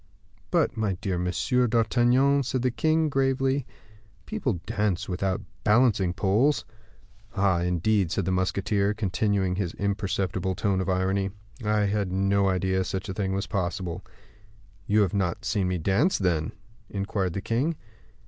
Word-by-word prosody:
"But, -, -, +1 dB
my 110 Hz, -3 st, 0 dB
dear 90 Hz, 0 st, -3 dB
Monsieur 125 Hz, +8 st, +1 dB
d'Artagnan," 120 Hz, +5 st, +3 dB
said 130 Hz, -1 st, -2 dB
the 125 Hz, -, +2 dB
king, 155 Hz, +5 st, +2 dB
gravely, 135 Hz, -1 st, +1 dB, 0.6 s
"people 215 Hz, -, -1 dB
dance 105 Hz, -4 st, -1 dB
without 95 Hz, 0 st, -1 dB, 0.2 s
balancing 105 Hz, -5 st, +3 dB
poles." 110 Hz, +9 st, +2 dB, 0.7 s
"Ah! 95 Hz, -3 st, +2 dB
indeed," 90 Hz, +2 st, +1 dB
said 95 Hz, -, -1 dB
the 95 Hz, -, 0 dB
musketeer, 100 Hz, +2 st, 0 dB
continuing 100 Hz, -2 st, 0 dB
his 95 Hz, -4 st, -2 dB
imperceptible 95 Hz, -2 st, -1 dB
tone 95 Hz, 0 st, 0 dB
of 95 Hz, -, -2 dB
irony, 95 Hz, +1 st, +1 dB, 0.3 s
"I 105 Hz, 0 st, +2 dB
had 100 Hz, -2 st, 0 dB
no 95 Hz, +1 st, +2 dB
idea 95 Hz, 0 st, +1 dB
such 95 Hz, +2 st, -4 dB
a -, -, -2 dB
thing 95 Hz, -1 st, -2 dB
was 100 Hz, +1 st, -1 dB
possible." 90 Hz, -2 st, -3 dB, 0.8 s
"You 105 Hz, +1 st, +4 dB
have 95 Hz, -4 st, +1 dB
not 95 Hz, -4 st, -1 dB
seen 100 Hz, -4 st, 0 dB
me 90 Hz, 0 st, 0 dB
dance, 100 Hz, -, +2 dB
then?" 85 Hz, -5 st, 0 dB, 0.4 s
inquired 100 Hz, -2 st, -2 dB
the 100 Hz, -, -3 dB
king. 130 Hz, +11 st, 0 dB
100 Hz, 145 wpm, -26 LUFS, 95-115 Hz, 0.8 s, You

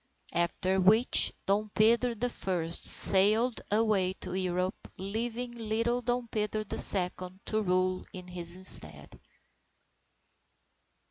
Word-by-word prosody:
After 185 Hz, +2 st, -1 dB
which, 220 Hz, +6 st, +4 dB
Dom 210 Hz, +2 st, -2 dB
Pedro 235 Hz, +2 st, +1 dB
the 245 Hz, +2 st, -4 dB
First, 170 Hz, -5 st, -2 dB
sailed 215 Hz, +5 st, +5 dB
away 205 Hz, -4 st, 0 dB
to 185 Hz, -, -9 dB
Europe, 185 Hz, 0 st, -4 dB
leaving 230 Hz, +5 st, -6 dB
little 230 Hz, +1 st, -3 dB
Dom 245 Hz, 0 st, -4 dB
Pedro 215 Hz, -1 st, -4 dB
the 215 Hz, -, -2 dB
Second, 185 Hz, 0 st, +2 dB
to 215 Hz, 0 st, -3 dB
rule 185 Hz, -1 st, -2 dB
in 180 Hz, -1 st, -11 dB
his 180 Hz, +1 st, -3 dB
stead. 75 Hz, -2 st, -5 dB
200 Hz, 115 wpm, -27 LUFS, 185-225 Hz, -, sailed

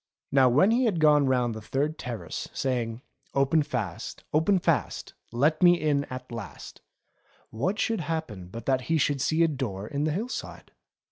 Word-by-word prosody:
Now 135 Hz, -2 st, +5 dB
when 150 Hz, -, +4 dB
he 250 Hz, +2 st, +3 dB
had 200 Hz, -7 st, +1 dB
gone 150 Hz, -2 st, +5 dB
round 125 Hz, -3 st, +1 dB
the 110 Hz, -, -7 dB
third 145 Hz, +8 st, -2 dB
terrace 120 Hz, -3 st, -5 dB
saying: 120 Hz, -2 st, -2 dB, 0.3 s
"Open 140 Hz, +3 st, +3 dB
fast, 110 Hz, -, -4 dB
open 160 Hz, +6 st, +3 dB
fast. 180 Hz, -, -1 dB, 0.2 s
Let 145 Hz, +7 st, +2 dB
me 175 Hz, -1 st, +6 dB
in 145 Hz, -2 st, +1 dB
at 130 Hz, -2 st, -8 dB
last," 115 Hz, -4 st, -8 dB, 0.7 s
what 180 Hz, -, -1 dB
should 225 Hz, -4 st, 0 dB
happen 150 Hz, -, -4 dB
but 115 Hz, +6 st, -9 dB
that 130 Hz, -1 st, +2 dB
he 165 Hz, -, +3 dB
should 145 Hz, -2 st, +1 dB
see 160 Hz, +4 st, +2 dB
a -, -, +5 dB
door 125 Hz, -10 st, -3 dB
in 140 Hz, +6 st, -2 dB
the 155 Hz, -, +1 dB
hill 205 Hz, +10 st, -2 dB
side. -, -, -7 dB
140 Hz, 180 wpm, -27 LUFS, 120-160 Hz, 0.7 s, me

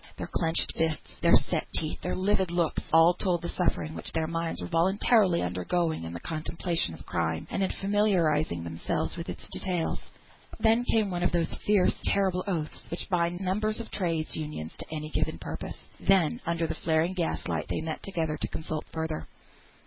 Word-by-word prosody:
Their -, -, -3 dB
clenched 165 Hz, -1 st, +2 dB
fists, 160 Hz, -1 st, -1 dB
their -, -, +7 dB
set -, -, +1 dB
teeth, 155 Hz, -1 st, -2 dB
their -, -, -2 dB
livid 190 Hz, -1 st, +2 dB
looks, 170 Hz, -1 st, +1 dB
all 165 Hz, +2 st, +7 dB
told 175 Hz, -2 st, 0 dB
the 170 Hz, -, -2 dB
suffering 160 Hz, -3 st, -1 dB, 0.2 s
their 160 Hz, -1 st, +1 dB
minds 165 Hz, 0 st, -2 dB
were -, -, -4 dB
voluntarily 185 Hz, +2 st, +3 dB
undergoing 125 Hz, -, 0 dB
in 80 Hz, -, -5 dB
the 85 Hz, -, -5 dB
contemplation 165 Hz, -, -1 dB
of -, -, -13 dB
crime, 80 Hz, -1 st, -1 dB
and 195 Hz, -, -1 dB
in 190 Hz, -, +2 dB
familiarising 175 Hz, -, +2 dB
themselves 85 Hz, 0 st, -2 dB
with -, -, -6 dB
its -, -, -7 dB
details. 175 Hz, -3 st, -1 dB, 0.6 s
Then 225 Hz, +2 st, +4 dB
came 215 Hz, -5 st, +2 dB
one 175 Hz, -1 st, -2 dB
of -, -, +2 dB
those 170 Hz, -1 st, +1 dB
fierce 205 Hz, -3 st, +5 dB
terrible 190 Hz, -2 st, +2 dB
oaths 165 Hz, -6 st, -3 dB
which 170 Hz, -, -5 dB
bind 175 Hz, 0 st, +1 dB
members 210 Hz, +4 st, +1 dB
of 230 Hz, -, -6 dB
Trades' 165 Hz, -5 st, -1 dB
Unions 150 Hz, -, -5 dB
to -, -, -5 dB
any 155 Hz, -1 st, -4 dB
given 155 Hz, +1 st, 0 dB
purpose. -, -, -6 dB, 0.2 s
Then, 195 Hz, +4 st, +3 dB
under 170 Hz, 0 st, +1 dB
the -, -, -1 dB
flaring 160 Hz, +2 st, +1 dB
gaslight, 175 Hz, -3 st, -1 dB
they -, -, -2 dB
met 160 Hz, 0 st, -4 dB
together 160 Hz, -5 st, -2 dB
to -, -, -2 dB
consult 155 Hz, -1 st, -4 dB
further. 160 Hz, -1 st, -3 dB
170 Hz, 180 wpm, -28 LUFS, 155-185 Hz, 0.6 s, their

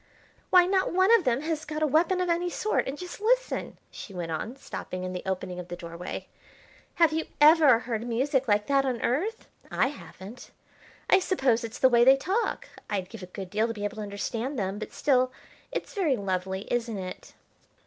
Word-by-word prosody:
"Why, 360 Hz, -1 st, +7 dB
not 380 Hz, +1 st, +1 dB
one 375 Hz, +5 st, +4 dB
of 380 Hz, -, +1 dB
them 250 Hz, +1 st, +2 dB
has 310 Hz, 0 st, -2 dB
got 305 Hz, 0 st, -3 dB
a -, -, +5 dB
weapon 335 Hz, +5 st, +2 dB
of 365 Hz, -, 0 dB
any 345 Hz, +1 st, +1 dB
sort; 425 Hz, +4 st, 0 dB
and 270 Hz, +2 st, -4 dB
just 360 Hz, +4 st, -8 dB
listen," -, -, 0 dB
she 195 Hz, -, -9 dB
went 170 Hz, -2 st, -4 dB
on, 220 Hz, +10 st, -4 dB
stopping 185 Hz, -8 st, -6 dB
in 185 Hz, 0 st, -4 dB
the 180 Hz, -, -4 dB
opening 185 Hz, -1 st, -3 dB
of 180 Hz, -, -7 dB
the 175 Hz, -, -5 dB
doorway, 170 Hz, +1 st, -7 dB, 0.7 s
"have 330 Hz, -2 st, +4 dB
you 320 Hz, 0 st, -1 dB
ever 300 Hz, -4 st, +7 dB
heard 230 Hz, -1 st, -4 dB
music 265 Hz, +3 st, 0 dB
like 210 Hz, -1 st, +2 dB
that 275 Hz, -1 st, +3 dB
on 255 Hz, -3 st, -1 dB
Earth? 375 Hz, -, -1 dB, 0.2 s
I 265 Hz, -, +1 dB
haven't. 230 Hz, -5 st, -11 dB, 0.6 s
I 380 Hz, -, +6 dB
suppose 265 Hz, -, +1 dB
it's 230 Hz, +1 st, -6 dB
the 260 Hz, -, +5 dB
way 240 Hz, -2 st, +5 dB
they 265 Hz, +2 st, +7 dB
talk. 385 Hz, +11 st, -1 dB, 0.2 s
I'd 190 Hz, -3 st, -2 dB
give 225 Hz, -2 st, -10 dB
a 185 Hz, -, -8 dB
good 185 Hz, 0 st, -8 dB
deal 215 Hz, +2 st, +1 dB
to 230 Hz, -, -4 dB
be 205 Hz, -, -6 dB
able 205 Hz, +1 st, -3 dB
to -, -, -4 dB
understand 225 Hz, +6 st, -4 dB
them. 195 Hz, -1 st, -2 dB
But -, -, -6 dB
still, 255 Hz, -2 st, +2 dB, 0.4 s
it's -, -, -4 dB
very 355 Hz, -, +1 dB
lovely, 190 Hz, -2 st, -2 dB
isn't 235 Hz, -3 st, -1 dB
it?" 185 Hz, -1 st, -7 dB
250 Hz, 205 wpm, -27 LUFS, 205-315 Hz, 0.7 s, Why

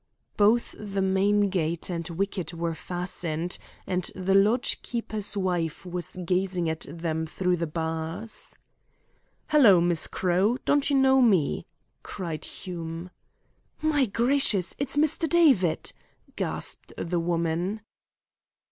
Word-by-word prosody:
Both 215 Hz, +3 st, +3 dB
the 200 Hz, -2 st, -4 dB
main 200 Hz, +1 st, +2 dB
gate 170 Hz, -3 st, -1 dB
and 170 Hz, -2 st, -3 dB
wicket 180 Hz, -1 st, -3 dB
were 165 Hz, 0 st, -2 dB
fastened, 175 Hz, 0 st, -3 dB, 0.3 s
and 180 Hz, -1 st, -1 dB
the 190 Hz, +1 st, 0 dB
lodge 210 Hz, +5 st, +3 dB
keeper's 215 Hz, -4 st, -3 dB
wife 175 Hz, -3 st, -1 dB
was 180 Hz, -1 st, -4 dB
gazing 180 Hz, -1 st, 0 dB
at 160 Hz, -, -6 dB
them 160 Hz, 0 st, -3 dB
through 180 Hz, +2 st, 0 dB
the 170 Hz, 0 st, -2 dB
bars. 160 Hz, +6 st, -4 dB, 0.9 s
"Hello, 250 Hz, -, +7 dB
Mrs. 170 Hz, -1 st, +1 dB
Crowe, 190 Hz, +6 st, +1 dB
don't 290 Hz, 0 st, +3 dB
you 285 Hz, -, +2 dB
know 265 Hz, 0 st, +5 dB
me?" 195 Hz, -, +2 dB, 0.3 s
cried 170 Hz, -5 st, -5 dB
Hume. 170 Hz, -1 st, -6 dB, 0.7 s
"My 300 Hz, -4 st, +2 dB
gracious, 230 Hz, -3 st, +2 dB
It's 280 Hz, +1 st, -1 dB
Mr. 310 Hz, +2 st, +2 dB
David!" 265 Hz, -, +3 dB, 0.4 s
gasped -, -, -3 dB
the 175 Hz, 0 st, -1 dB
woman. 170 Hz, +4 st, -1 dB
185 Hz, 120 wpm, -27 LUFS, 170-215 Hz, 0.9 s, Hello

